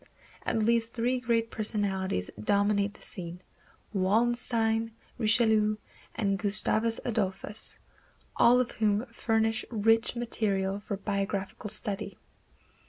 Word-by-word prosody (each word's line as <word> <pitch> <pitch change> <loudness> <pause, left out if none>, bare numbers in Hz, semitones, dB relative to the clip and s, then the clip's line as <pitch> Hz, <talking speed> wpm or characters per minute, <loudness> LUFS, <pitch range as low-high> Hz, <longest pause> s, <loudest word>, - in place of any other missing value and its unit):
At - - +1
least 230 0 +1
three 250 +2 +1
great 230 -2 0
personalities 195 - -1
dominate 205 - +2
the - - -13
scene, 175 -2 -4 0.5
Wallenstein, 225 +2 +1 0.3
Richelieu 220 -2 +3 0.4
and 195 -3 0
Gustavus 220 +2 +1
Adolphus, 205 -2 -2 0.6
all 245 +1 +6
of 250 - 0
whom 215 +1 +1
furnish 225 0 +1
rich 225 +1 +2
material 200 -5 0
for 205 -1 -4
biographical 200 +1 -3
study. 210 0 -3
215 Hz, 100 wpm, -29 LUFS, 200-230 Hz, 0.6 s, all